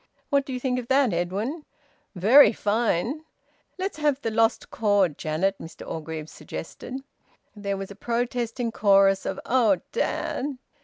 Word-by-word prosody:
What 280 -1 +3
do - - -5
you 250 - -3
think 250 0 0
of 240 - -7
that, 265 -5 +3
Edwin?" 200 - -2 0.5
"Very 230 +10 +7
fine!" 225 - 0 0.5
"Let's 375 -3 -3
have 295 -3 +1
the 225 - -2
`Lost 225 +1 +1
Chord,' 205 -7 +2
Janet," 170 +7 -1
Mr 165 - -10
Orgreave 160 -1 -5
suggested. 255 +12 -8 0.5
There 200 -1 -3
was 195 0 -6
a - - -9
protesting 240 +1 -2
chorus 195 -2 +4
of - - -3
"Oh, 225 -7 +3
dad!" 285 - -2
225 Hz, 145 wpm, -25 LUFS, 195-260 Hz, 0.5 s, Very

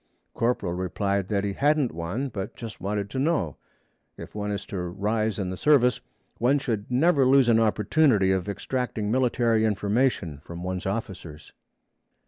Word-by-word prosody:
Corporal 115 -7 0
replied 95 +2 -1
that 100 -1 0
he 100 -1 -1
hadn't 145 +1 +2
one, 90 +12 -3
but 100 -5 -6
just 115 -5 -8
wanted 100 +1 -2
to 130 - -3
know. 135 - 0 0.6
If - - -10
one 105 0 -3
is 100 -1 -3
to 95 - -5
rise 105 +5 -1
in 95 -3 -2
the 95 - -5
service, 125 -3 +3 0.4
one 125 +5 +3
should 115 -6 -3
never 140 +3 +3
lose 130 0 +5
an 115 -1 +5
opportunity 110 -1 +3
of 95 +1 -1
extracting 110 -1 -3
military 120 -3 +2
information 105 - 0
from 85 +2 -8
one's 95 0 -3
officers. 95 -7 -6
105 Hz, 155 wpm, -26 LUFS, 95-125 Hz, 0.6 s, lose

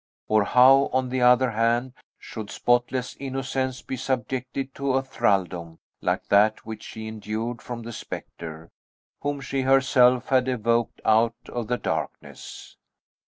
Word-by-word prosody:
Or 110 -1 +3
how, 130 +4 +6
on 130 0 0
the 130 0 -1
other 125 0 +5
hand, 115 +3 +1 0.2
should 110 -3 -8
spotless 120 +2 0
innocence 135 -1 -3
be 130 - -5
subjected 130 +1 -3
to 140 -1 -1
a 135 0 +1
thraldom 90 -9 -1 0.2
like - - -1
that 105 +2 +3
which 110 -1 -7
she 110 0 -8
endured 110 +2 -4
from 120 -1 -7
the 120 +1 -7
spectre, 80 -5 -8 0.5
whom 145 -1 -2
she 135 +1 -2
herself 130 -2 +4
had 130 -1 +3
evoked 115 -2 0
out 115 +1 +3
of 120 -3 -4
the 125 - 0
darkness! - - -6
125 Hz, 140 wpm, -25 LUFS, 110-130 Hz, 0.5 s, how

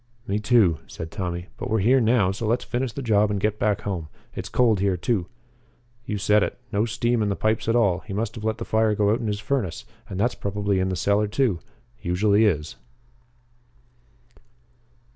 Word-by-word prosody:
"Me, 100 -1 -1
too," 100 - +3
said 80 0 -7
Tommy. 90 -3 -4
"But - - -5
we're 110 - +2
here 125 +6 +4
now, 110 -4 +3
so 105 +3 -4
let's 120 +3 +1
finish 125 0 -2
the 140 - -6
job 105 -3 +3
and 100 -1 -1
get 105 +1 -1
back 105 0 +1
home. 90 -6 -3 0.3
It's - - -6
cold 115 -5 +3
here, 95 -2 +1
too." 90 0 -1 0.8
"You 105 - -2
said 105 +1 +3
it. - - -1
No 105 0 +1
steam 120 +1 0
in 105 - +1
the 100 - 0
pipes 110 +2 0
at 115 - +2
all. 100 -7 +3
He 110 - -11
must 105 +4 -2
have 110 - -8
let 110 -1 -1
the - - -5
fire 110 -1 +2
go 105 0 +2
out 110 - +1
in 115 - -3
his 105 -1 -1
furnace, 105 -5 -2 0.2
and 95 - -5
that's 120 +4 +2
probably 100 -1 -1
in 95 0 0
the 95 - -1
cellar 100 +4 +2
too 105 -4 +1 0.4
usually 100 +5 +3
is." 80 -6 0
105 Hz, 200 wpm, -24 LUFS, 95-115 Hz, 0.8 s, here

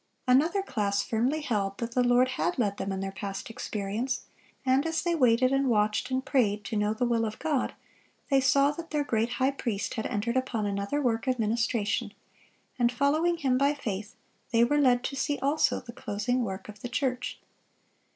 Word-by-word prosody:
Another 320 +10 +3
class 200 - 0
firmly 250 +8 0
held 200 -8 -1
that 235 0 -4
the 250 - +2
Lord 245 +1 +4
had 265 +6 -1
led 205 -5 0
them 195 - -3
in 190 0 -3
their 195 0 -3
past 195 +2 -6
experience; 220 +4 -3 0.4
and 260 +1 +3
as 325 0 -1
they 345 0 +1
waited 255 -3 +3
and 270 -1 +2
watched 210 +2 +1
and 260 0 -1
prayed 210 -6 +1
to 210 - -4
know 210 0 +1
the 220 +3 0
will 235 -1 +1
of 215 -1 -3
God, 295 -5 -1 0.6
they 270 -1 +5
saw 275 +2 +4
that 330 +2 -8
their 300 -1 0
great 235 -2 0
High 260 +2 +2
Priest 235 -7 -3
had 220 - -2
entered 235 +3 -1
upon 250 -5 -1
another 200 +7 -1
work 230 0 0
of 255 -1 +1
ministration, 220 -1 0 0.6
and 240 -1 +3
following 310 +7 +2
Him 260 -5 +1
by 280 +1 +3
faith, 210 -4 -5 0.4
they 230 -1 +4
were 290 +5 +3
led 250 -2 +4
to 275 - -3
see 285 +1 -1
also 285 +3 +1
the 235 -1 -11
closing 245 +3 -1
work 190 -3 -5
of 210 -1 -11
the 245 - -5
church. 250 0 -2
245 Hz, 195 wpm, -28 LUFS, 210-270 Hz, 0.6 s, they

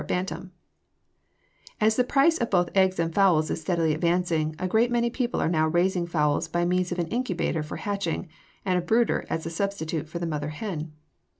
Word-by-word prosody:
262. 180 +2 -2
INCUBATOR] 185 - -11 1.3
As 220 0 +3
the 250 - +3
price 285 +6 +3
of 235 - -1
both 175 -2 +2
eggs 190 -1 +3
and 165 -1 -1
fowls 175 -6 +3
is - - -3
steadily 165 -1 +1
advancing, 165 -1 0
a 185 - -2
great 225 +5 +3
many 235 -1 +1
people 245 -1 -1
are - - +1
now 160 -1 +2
raising 175 +2 +1
fowls 150 -1 +1
by 175 +1 0
means 180 0 0
of 175 - -2
an 175 - 0
incubator 185 -9 -1
for 150 - -6
hatching, 200 -4 -3 0.4
and 185 -2 +2
a - - -2
brooder 225 +6 +1
as 160 - -2
a 165 - -4
substitute 165 -4 -3
for 170 - -5
the 170 - -3
mother 150 -2 -3
hen. 160 -1 -5
175 Hz, 200 wpm, -26 LUFS, 160-200 Hz, 1.3 s, As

